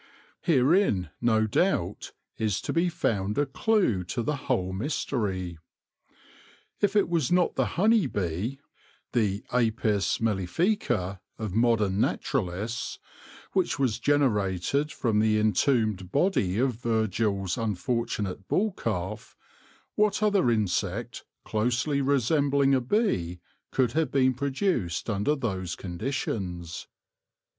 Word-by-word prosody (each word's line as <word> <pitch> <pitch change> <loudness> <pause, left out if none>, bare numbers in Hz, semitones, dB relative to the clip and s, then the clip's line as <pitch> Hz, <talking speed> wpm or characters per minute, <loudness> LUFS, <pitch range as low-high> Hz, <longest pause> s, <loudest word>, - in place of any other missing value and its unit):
Herein, 135 - +3
no 110 -2 +3
doubt, 110 - 0 0.3
is 105 -3 0
to - - -3
be 170 +2 +2
found 105 - -1
a 145 - +3
clue 140 - +1
to 115 +6 -3
the 150 +5 0
whole 115 -9 -1
mystery. 95 - -2 1.2
If 205 0 +1
it 205 - +4
was 165 -5 0
not 180 -1 +3
the - - +1
honey 215 -2 +4
bee 100 +6 -3 0.3
— - - -34
the 105 -4 +1
Apis 110 -4 +1
mellifica 105 - 0 0.2
of 110 -4 -4
modern 110 -3 +2
naturalists 115 0 -2 0.3
— - - -20
which 185 -5 +1
was 130 -6 0
generated 135 - +1
from 110 -4 0
the 110 0 +3
entombed 110 -4 +1
body 140 - +1
of 130 +2 +2
Virgil's 105 -4 0
unfortunate 110 -3 -2
bull 215 +3 +1
calf, - - -4 0.6
what 210 0 +1
other 200 - +3
insect, 110 +1 -1 0.2
closely 120 +6 0
resembling 140 +1 +2
a 130 - +3
bee, 120 - 0 0.3
could 125 -3 +1
have 155 0 0
been 130 -1 +3
produced 130 - -1
under 105 +9 +1
those 95 - -3
conditions 90 - -4
115 Hz, 115 wpm, -27 LUFS, 100-140 Hz, 1.2 s, it